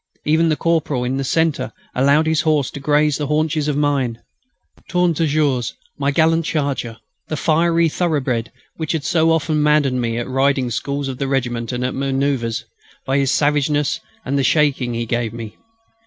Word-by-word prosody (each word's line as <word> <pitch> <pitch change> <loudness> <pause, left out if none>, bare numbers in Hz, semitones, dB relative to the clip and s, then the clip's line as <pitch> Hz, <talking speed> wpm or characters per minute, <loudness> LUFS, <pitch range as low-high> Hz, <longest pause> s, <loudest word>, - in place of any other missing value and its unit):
Even 160 +2 +3
the 155 - +2
corporal 155 -6 0
in 130 +2 -1
the 135 - -1
centre 160 +3 0 0.2
allowed 140 +4 +3
his 160 -1 +2
horse 150 -4 +1
to - - -7
graze 150 +1 +2
the 145 - -2
haunches 155 0 0
of 145 -1 0
mine, 135 -6 0 0.7
"Tourne 180 -1 +2
Toujours," 145 -6 0 0.2
my 140 0 +1
gallant 165 +3 +3
charger, 140 -7 -2 0.3
the 155 - -3
fiery 165 +2 +2
thoroughbred 135 -9 -1 0.3
which 160 -1 -2
had 160 -3 -2
so 165 0 +2
often 160 -1 +1
maddened 145 -4 +2
me 115 -1 -1
at 120 - -2
the - - -8
riding 135 -1 +1
schools 140 +4 -2
of 130 -2 -5
the 140 - -1
regiment 120 -3 -1
and 125 0 -2
at 130 - -2
manoeuvres, 135 -4 -1 0.4
by 135 +1 +1
his 135 -1 +1
savageness 145 0 +1 0.3
and 140 +2 0
the - - +1
shaking 135 -5 +2
he 115 0 -2
gave 115 -1 -2
me. 115 -2 -7
140 Hz, 180 wpm, -19 LUFS, 130-155 Hz, 0.7 s, Even